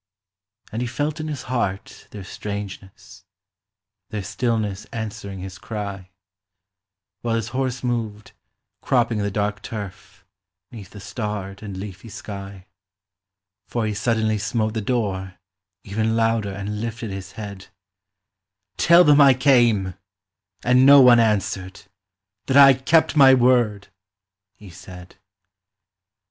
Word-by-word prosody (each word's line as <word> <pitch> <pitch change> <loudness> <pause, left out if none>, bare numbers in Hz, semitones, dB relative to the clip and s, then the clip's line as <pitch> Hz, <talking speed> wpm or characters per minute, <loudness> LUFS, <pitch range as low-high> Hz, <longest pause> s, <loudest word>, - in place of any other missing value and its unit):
And 115 - -4
he 125 - -2
felt 145 +6 -3
in 155 - -4
his 145 -4 -5
heart 110 -6 -4
their 100 -2 -9
strangeness, 100 0 -8 0.9
Their 105 -2 -4
stillness 105 -1 -2
answering 100 -4 -7
his 95 -1 -8
cry, 100 -4 -6 1.1
While 115 -1 -1
his 115 0 -2
horse 130 0 -3
moved, 110 -4 -3 0.5
cropping 120 -3 +1
the 100 0 -1
dark 105 0 -2
turf, 100 -3 -9 0.5
'Neath 105 -6 -10
the 105 - -12
starred 100 -2 -5
and 100 -3 -7
leafy 100 +3 -8
sky; 100 -3 -9 1.0
For 120 -2 -2
he 105 - -2
suddenly 110 0 0
smote 110 +1 -1
the 110 - -2
door, 100 -5 -2 0.5
even 110 +2 -1
Louder, 115 -2 +1
and 100 +2 -5
lifted 115 -2 -5
his 95 -1 -8
head: 100 -3 -8 1.1
"Tell 170 - +6
them 150 -2 +6
I 135 -2 +7
came, 120 -8 +3 0.7
and 125 +1 +4
no 140 +1 +9
one 125 -2 +7
answered, 100 -4 -1 0.6
That 135 - +3
I 135 -1 +9
kept 155 +6 +2
my 135 -3 +7
word," 120 -5 +2 0.7
he 100 -3 -14
said. 90 0 -13
110 Hz, 125 wpm, -22 LUFS, 100-120 Hz, 1.1 s, no